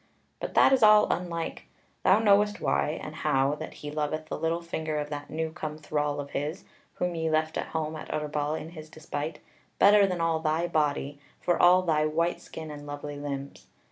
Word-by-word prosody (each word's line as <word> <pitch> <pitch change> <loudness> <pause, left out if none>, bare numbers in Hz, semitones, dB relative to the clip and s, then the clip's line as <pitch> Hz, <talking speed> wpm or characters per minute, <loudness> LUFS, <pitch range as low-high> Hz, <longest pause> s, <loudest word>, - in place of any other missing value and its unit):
But - - -5
that - - +6
is 265 - +3
all 215 -1 +7
unlike: 170 -2 -4 0.3
thou 190 - +5
knowest 210 -1 +3
why, - - 0
and - - -7
how 135 +1 +2
that 155 - -7
he 145 - -4
loveth 155 +1 -3
the - - -4
little 165 +1 -1
finger 160 -2 -3
of 150 0 -3
that 145 -1 -5
new 160 0 -2
come 155 -2 -5
thrall 150 -1 -2
of 140 0 -6
his 150 +5 -3 0.3
(whom 180 0 -1
ye 160 -1 -1
left 155 0 +1
at - - -2
home 160 -1 -3
at 155 - -8
Utterbol 150 0 -1
in 155 - -8
his 155 -2 -10
despite), 155 -1 -5 0.4
better 205 0 +6
than 180 -2 -2
all 165 -1 +1
thy 160 +1 0
body, 145 -3 -1 0.2
for 175 - +1
all 180 +1 +6
thy 155 -3 +2
white 165 +3 0
skin 160 -1 -8
and 145 0 -9
lovely 145 0 -6
limbs. 140 -1 -6
155 Hz, 200 wpm, -28 LUFS, 150-170 Hz, 0.4 s, all